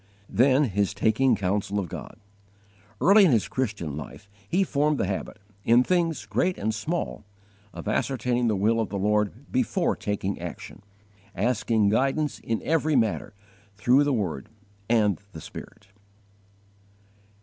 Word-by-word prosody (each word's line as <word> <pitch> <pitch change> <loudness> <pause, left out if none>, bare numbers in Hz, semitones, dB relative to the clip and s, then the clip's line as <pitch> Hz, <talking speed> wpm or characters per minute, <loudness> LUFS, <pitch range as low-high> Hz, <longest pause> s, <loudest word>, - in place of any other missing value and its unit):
4. - - -13
Then 130 +4 +5
his 100 -4 0
taking 110 +6 +3
counsel 100 +1 -1
of 95 - -3
God. - - -8 0.8
Early 200 +2 +6
in 180 - +5
his 115 -4 +2
Christian 105 - -3
life 75 +5 -9 0.2
he 190 +3 +2
formed 150 -3 +1
the - - 0
habit, 95 0 -4 0.3
in 120 +2 +5
things 170 0 0
great 180 0 0
and 110 +2 -1
small, 155 +11 -3 0.5
of - - -9
ascertaining 120 +1 0
the 110 - +2
will 110 +4 +2
of 110 - -1
the 100 - -3
Lord 105 +6 -1
before 225 -8 +1
taking 100 -1 -3
action, - - -8 0.5
asking 110 0 +1
guidance 135 +7 0
in 115 -1 -3
every 155 -1 +1
matter, 110 -3 0 0.4
through 125 +8 +4
the 145 - +1
Word 95 - -2 0.4
and 105 -6 +2
the 80 - -8
Spirit. 95 - -11
115 Hz, 145 wpm, -26 LUFS, 100-140 Hz, 0.8 s, Early